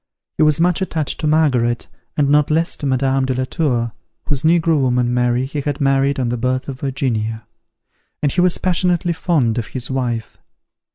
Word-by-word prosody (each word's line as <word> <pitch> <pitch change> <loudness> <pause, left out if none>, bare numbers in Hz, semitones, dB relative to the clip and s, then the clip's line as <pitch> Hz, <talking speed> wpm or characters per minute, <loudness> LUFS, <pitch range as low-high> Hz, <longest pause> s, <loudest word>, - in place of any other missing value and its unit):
He - - 0
was 155 0 +4
much 175 +2 +2
attached 160 -6 -2
to 155 - -1
Margaret, 130 -7 +2 0.3
and 145 -2 +3
not 145 0 +3
less 165 +2 +1
to 145 - -3
Madame 135 0 +1
de 130 -1 -1
la 130 - 0
Tour, 125 -7 -1 0.3
whose 140 -3 -1
negro 165 -2 +3
woman, 125 -1 +1
Mary, 125 +1 +1
he 145 +2 -4
had 145 0 -3
married 135 0 +2
on 125 -2 0
the 120 - -1
birth 130 +2 -1
of 135 -2 -6
Virginia; 115 -5 -2 0.8
and 145 - +2
he 180 - +1
was 180 -1 +3
passionately 175 -1 +1
fond 140 -9 +1
of 110 - -4
his 125 0 -6
wife. 120 -4 -3
135 Hz, 185 wpm, -19 LUFS, 125-155 Hz, 0.8 s, was